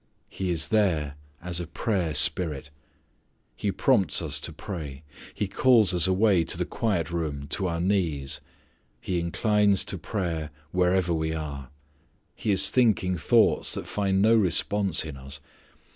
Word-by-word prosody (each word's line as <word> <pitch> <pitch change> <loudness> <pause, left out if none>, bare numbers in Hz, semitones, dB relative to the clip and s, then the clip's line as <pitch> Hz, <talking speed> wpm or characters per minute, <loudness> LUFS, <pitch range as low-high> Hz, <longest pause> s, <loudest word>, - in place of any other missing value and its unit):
He 95 -1 -4
is 80 -3 -1
there 85 -10 +1 0.3
as 90 -1 -1
a 85 - -5
prayer 85 -3 -2
spirit. 75 -1 +3 0.8
He 100 +10 -2
prompts 100 - +2
us 75 -3 -3
to 80 - -6
pray. 75 -5 -8 0.3
He 105 - -3
calls 110 -3 +4
us 90 0 +4
away 95 -1 +3
to - - -1
the - - -1
quiet 95 -8 -2
room 75 -4 -3
to 95 +4 -2
our 85 -1 -3
knees. 85 -7 -1 0.6
He 90 -2 -2
inclines 100 +3 +2
to - - -6
prayer 85 -7 -3 0.2
wherever 90 -1 +1
we 80 0 -2
are. 70 -4 -6 0.6
He - - -5
is 95 0 +4
thinking 105 -7 +2
thoughts 80 - +2
that - - -5
find 95 -1 0
no 110 +2 +5
response 100 -3 +2
in 75 -3 -8
us. 70 +2 -9
90 Hz, 150 wpm, -26 LUFS, 80-100 Hz, 0.8 s, no